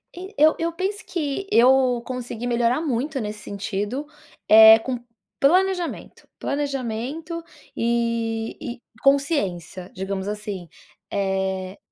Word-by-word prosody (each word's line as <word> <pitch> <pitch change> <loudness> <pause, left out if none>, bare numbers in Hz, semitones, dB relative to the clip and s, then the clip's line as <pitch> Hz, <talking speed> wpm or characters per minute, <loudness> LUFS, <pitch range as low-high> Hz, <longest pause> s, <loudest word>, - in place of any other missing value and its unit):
E 375 +3 -9
eu 310 +2 +5
eu 335 +1 0
penso 395 +4 -3
que 335 +3 -3
eu 250 0 +5
consegui 245 -2 -5
melhorar 240 +4 +1
muito 275 0 -1
nesse 210 -1 -5
sentido, 205 +7 -4 0.4
eh, 220 +1 +9
com 250 +1 -4 0.4
planejamento, 360 +3 +1
planejamento 280 +4 -3 0.3
e 230 -1 -1 0.2
e - - -34 0.2
consciência, 205 - 0
digamos 190 +1 -4
assim. 205 -4 -5 0.4
Eh 190 -1 -2
240 Hz, 105 wpm, -23 LUFS, 210-290 Hz, 0.4 s, eh